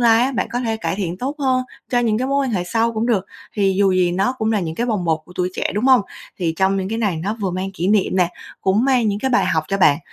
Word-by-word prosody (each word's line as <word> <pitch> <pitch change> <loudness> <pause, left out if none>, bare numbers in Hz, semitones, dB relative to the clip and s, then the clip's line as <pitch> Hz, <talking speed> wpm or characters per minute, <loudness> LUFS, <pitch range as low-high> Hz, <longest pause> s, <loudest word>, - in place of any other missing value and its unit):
lai 230 0 +5
á, 270 +2 +1
bạn - - -1
có 245 - -2
thể 225 -2 -1
cải 220 - -2
thiện 180 -2 -3
tốt 275 +4 -3
hơn 260 -2 +1 0.3
cho 245 - +2
những 225 -2 +1
cái 255 - -1
mối 275 0 +1
quan - - -2
hệ 180 -4 -1
sau 230 +5 0
cũng 225 +1 -1
được, 205 -6 +1 0.3
thì 195 -2 +2
dù 195 -2 +4
gì 180 -1 +2
nó 195 +7 +1
cũng 220 0 0
là 210 - +1
những 160 -2 -4
cái 240 +5 -1
bồng 210 -6 -1
bột 160 -1 +1
của 180 - -15
tuổi 180 0 0
trẻ, - - -2
đúng 210 +4 -1
hông? 260 -2 +6 0.4
Thì 170 -3 0
trong 190 +1 +2
những 190 -1 -2
cái 225 +2 -2
này 205 -7 0
nó 200 +7 -3
vừa 195 -2 -1
mang 185 +2 -3
kỷ 180 +2 -1
niệm 205 -2 +2
nè, 180 -2 +3 0.3
cũng 200 +6 +2
mang 250 -5 +3
những 200 0 -1
cái 265 - -1
bài 250 - +3
học 160 -3 0
cho 195 - 0
bạn. 145 -6 +5
205 Hz, 310 wpm, -20 LUFS, 185-235 Hz, 0.4 s, hông